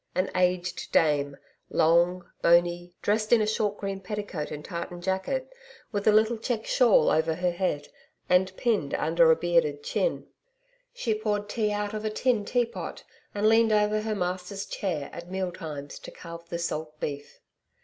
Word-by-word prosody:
An 185 +1 0
aged 180 0 0
dame, 145 -3 +2 0.3
long, 175 +2 +3
bony 175 +1 +3
dressed 215 +1 +1
in 240 - +7
a 215 - +2
short 210 -1 0
green 195 -1 -4
petticoat 195 -5 -4
and 150 0 -7
tartan 170 +1 -5
jacket, 190 - -2 0.4
with 205 -2 -2
a - - +8
little 220 +2 +3
checked 230 -1 -2
shawl 235 - +4
over 160 +1 +2
her 180 +1 0
head 175 -5 -2 0.4
and 185 +1 +3
pinned 230 -3 0
under - - +3
a 485 - +7
bearded 470 -3 +1
chin. - - -1 0.7
She 260 - -1
poured 210 -1 -1
tea 210 0 0
out 205 0 -2
of 215 0 -4
a 215 - 0
tin 215 -1 +1
teapot 240 0 -2 0.3
and 205 +1 +2
leaned 225 0 +5
over 210 0 +2
her 215 0 -2
master's 185 +2 -3
chair 165 -8 -3
at 170 +1 -8
meal 190 -1 -2
times 145 -4 -7
to - - -9
carve 170 -1 -10
the 170 - -2
salt 155 -2 -4
beef. 145 -1 -5
195 Hz, 170 wpm, -27 LUFS, 170-215 Hz, 0.7 s, a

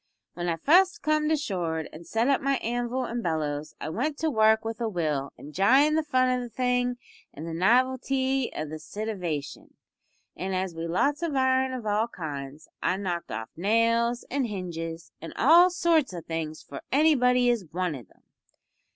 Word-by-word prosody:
When 175 0 -3
I 165 - +1
fust 370 - +4
comed 305 0 +1
ashore 175 - -1
an' 165 +2 -11
set 225 +6 0
up 275 -1 +2
my 275 0 +1
anvil 245 +1 -2
an' 235 0 -3
bellows 155 -4 -2
I - - -4
went 285 - -2
to 320 0 0
work 220 -2 +3
with 225 0 -4
a 230 - 0
will, 150 -7 -2
enjyin' 240 - +3
the 315 - +3
fun 255 -4 +2
o' 250 0 0
the 245 - -6
thing 245 +1 0 0.4
an' 155 - -7
the 165 - -5
novelty 260 +6 +1
of 155 -1 -5
the 155 - -6
sitivation; 175 -4 -5 0.6
an' 190 +3 -3
as 185 -1 -2
we'd 165 +1 -5
lots 280 - +1
of 330 -4 -2
iron 260 0 +2
of 255 -3 -5
all 210 +2 +1
kinds 150 -6 -7
I 185 - +1
knocked 180 -3 -4
off 110 +1 -5
nails 230 +5 +1
an' 275 0 0
hinges 170 -5 -6
an' 165 - -8
all 340 +8 +6
sorts 335 - +1
o' 170 - -5
things 160 -1 -5
for 140 - -9
anybody 250 -4 +4
as 235 -5 -1
wanted 165 - -3
'em. - - -28
225 Hz, 175 wpm, -27 LUFS, 165-260 Hz, 0.6 s, all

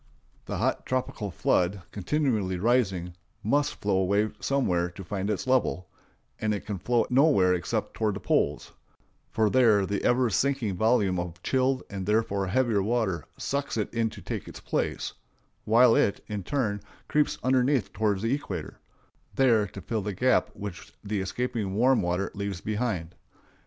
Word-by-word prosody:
The - - -4
hot - - -1
tropical 125 -5 -2
flood, 90 +1 +1
continually 105 -4 0
rising, 95 -5 +1 0.3
must 145 +7 +1
flow 100 -2 0
away 100 +3 +2
somewhere 90 -11 +1
to 90 +2 -10
find 95 +2 -3
its 105 +2 -1
level; 125 -8 +1 0.5
and 110 -1 0
it 100 - -7
can 105 -3 -4
flow 120 +3 +1
nowhere 125 -9 +5
except 90 - -2
toward 110 -3 0
the - - -4
poles, 70 -6 0 0.6
for 110 -1 +2
there 110 -4 +4
the 100 +1 -2
ever 125 -1 +3
sinking 130 -3 0
volume 105 -3 +2
of 85 0 -6
chilled 130 0 +1
and 95 -2 -6
therefore 105 -3 +1
heavier 115 -1 +2
water 105 - 0
sucks 140 -3 -2
it 105 - -2
in 115 -1 +1
to - - -11
take - - -5
its - - -9
place, - - -2 0.5
while 115 +2 +6
it, 100 - +1
in 105 -2 -4
turn, 105 -2 -1 0.3
creeps 150 -1 +1
underneath 130 -2 +2
toward 105 -3 0
the 115 +3 +1
equator, 95 - -5 0.6
there 115 -6 +4
to 100 +1 -9
fill 110 +1 -2
the 100 0 -4
gap 130 +6 +2
which 100 -4 -8
the 105 -1 -2
escaping 105 -1 -2
warm 125 +3 +4
water 90 +2 -1
leaves 100 -2 -4
behind. 105 -6 -2
105 Hz, 160 wpm, -27 LUFS, 95-125 Hz, 0.6 s, while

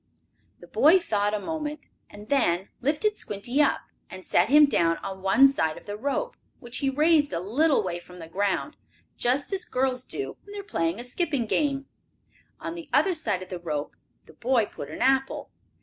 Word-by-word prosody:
The - - -11
boy 320 +6 +5
thought 210 - 0
a - - -2
moment, 300 +2 -5 0.2
and 205 +1 -12
then 195 -9 +1
lifted 315 - 0
Squinty 240 +8 -1
up, 290 - +2 0.3
and 185 0 -10
set 180 +5 +3
him 295 +2 +8
down 165 -11 +2
on 190 -1 -6
one 195 +8 +6
side 160 - 0
of - - -13
the 205 - -5
rope, 285 - -2 0.2
which 240 0 -4
he 275 - +1
raised 300 +1 +3
a 170 - 0
little 260 - +2
way 175 -2 -3
from 180 +1 -14
the 165 -2 -9
ground, 200 - -1 0.4
just 265 +9 0
as 390 +1 -1
girls 255 - -1
do 405 - -5
when 405 - -13
they 410 - -5
are - - -6
playing 165 - -1
a - - -5
skipping 280 -1 -1
game. 275 +3 0 0.7
On - - -5
the 340 -1 -9
other 385 - +3
side 210 - -2
of 185 - -13
the 180 - -5
rope 155 -4 -4 0.3
the - - -16
boy 240 -2 +1
put - - -9
an - - -3
apple. 270 +1 +1
255 Hz, 195 wpm, -26 LUFS, 195-300 Hz, 0.7 s, him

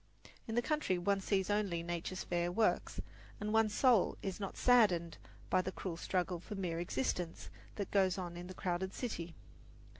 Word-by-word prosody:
In 225 - -3
the 240 - +2
country 300 - +1
one 195 +2 +1
sees 190 0 +1
only 200 -5 0
Nature's 175 +2 -3
fair 175 0 0
works, 220 +4 +1 0.4
and 210 +1 -2
one's 220 -1 +3
soul 245 -7 +4
is 195 0 -3
not 195 -2 -5
saddened 195 -9 +4 0.3
by 185 - +5
the 185 - -3
cruel 185 -2 -4
struggle 180 0 -1
for 205 - -7
mere 175 -4 -2
existence 170 +1 -2 0.2
that 200 - -4
goes 190 -2 +3
on 175 -2 -4
in 175 +1 -7
the 185 - -8
crowded 185 +1 -2
city. 170 -9 -4
185 Hz, 175 wpm, -35 LUFS, 175-205 Hz, 0.4 s, by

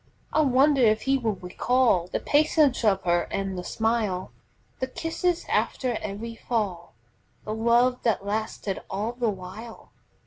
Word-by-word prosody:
I 310 - +4
wonder 275 0 +4
if 215 -2 +3
he 270 0 +2
will 225 -4 -1
recall 185 +1 +1
The - - -2
patience 295 -3 +3
of 195 -3 +2
her 175 -1 +1
and 195 -1 -2
the 180 - -5
smile, 220 -4 -1 0.5
The 260 - -1
kisses 330 +5 -2
after 250 -3 0
every 210 +3 -5
fall, 205 - -3 0.5
The 215 - -3
love 235 +3 +2
that 215 -4 0
lasted 210 -1 -3
all 210 +4 -2
the 240 -2 -1
while? 200 +4 -8
225 Hz, 145 wpm, -26 LUFS, 195-255 Hz, 0.5 s, I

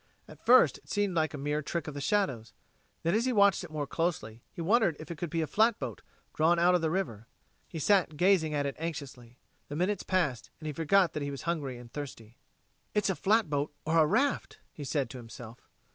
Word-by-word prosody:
At - - -15
first 255 +2 +6
it - - -24
seemed 205 -3 0
a 155 -2 0
mere 145 +2 -1
trick 160 +2 -4
of 150 - -5
the 145 - -5
shadows; 135 - 0 0.5
then, 170 - +1
as 225 +3 +2
he 255 - +1
watched 200 -4 +4
it 175 - -8
more 155 -2 -3
closely, 135 -9 -2
he - - -13
wondered 185 0 +3
if 155 +1 -8
it 170 - -6
could 175 - -3
be 165 +2 -1
a - - 0
flatboat, 205 - +1 0.3
drawn 165 +3 +3
out 175 +2 +4
of 180 - +3
the 160 - +1
water. 135 - -3 0.4
He 165 - -8
sat 170 -2 +2
gazing 175 -4 +3
at 145 -1 0
it 140 - -3
anxiously. 135 -7 -6 0.3
The 145 - -6
minutes 185 +4 0
passed 165 -10 -1
and 155 - -11
he 155 - -3
forgot 170 +4 +3
that 150 - -3
he 140 - -2
was 140 -1 -6
hungry 145 -7 -2
and 120 -1 -13
thirsty. 120 -6 -8 0.6
"It's 210 -2 +2
a - - -2
flatboat 150 -10 +1
or 165 +1 +3
a 155 - +5
raft," 265 - 0 0.2
he 150 - -8
said 140 -1 -1
to 130 - -8
himself. 115 0 -10
160 Hz, 220 wpm, -30 LUFS, 140-185 Hz, 0.6 s, first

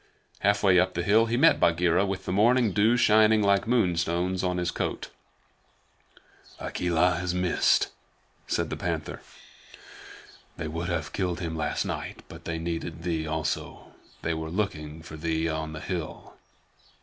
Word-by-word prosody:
Halfway 100 -2 +4
up 90 +1 +1
the 85 - -1
hill 110 +5 +4
he 115 +1 0
met - - +5
Bagheera 85 +3 +3
with 95 -1 -4
the - - -2
morning 115 +3 +3
dew 110 +5 +3
shining 110 -1 +5
like 100 +1 +2
moonstones 90 -5 +1
on 90 -1 0
his 90 -1 -1
coat. - - -3 1.5
"Akela 90 0 +1
has 90 0 -2
missed," 90 -1 +2 0.6
said - - -1
the - - -1
Panther. - - -4 1.4
"They 80 - -4
would 85 +3 -4
have 80 -4 -3
killed 90 -3 -1
him 85 -3 -4
last 75 -2 -1
night, - - -5
but - - -12
they 85 -1 -3
needed 85 0 -4
thee 80 -3 -2
also. 80 0 -3 0.3
They 85 - 0
were 80 0 -4
looking 80 -5 -3
for 80 -2 -9
thee 80 +1 -1
on 80 -1 -3
the 75 - -6
hill." 85 -4 -5
90 Hz, 150 wpm, -27 LUFS, 80-100 Hz, 1.5 s, met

